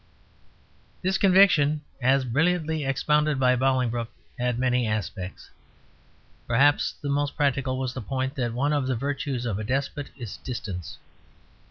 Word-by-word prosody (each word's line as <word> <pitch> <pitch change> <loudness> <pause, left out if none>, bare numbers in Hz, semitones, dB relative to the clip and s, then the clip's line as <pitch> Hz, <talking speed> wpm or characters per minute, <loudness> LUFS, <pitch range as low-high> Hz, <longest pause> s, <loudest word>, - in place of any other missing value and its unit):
This 190 +1 +1
conviction, 180 -7 +5 0.2
as 130 +1 +3
brilliantly 160 +4 +1
expounded 150 +1 +1
by 125 -1 +4
Bolingbroke, 125 -3 0 0.3
had 125 -1 0
many 125 -1 +1
aspects; 105 -3 -4 1.0
perhaps 140 +5 +3
the - - -3
most 145 0 -1
practical 135 -3 +1
was 130 -1 -2
the 130 - -5
point 130 +4 -2
that 120 -5 -2
one 140 +5 0
of 140 -3 0
the 130 - 0
virtues 135 0 -3
of 105 -4 -2
a - - -3
despot 135 +4 -2
is 120 -6 -7
distance. 95 - -6
130 Hz, 140 wpm, -26 LUFS, 120-145 Hz, 1.0 s, conviction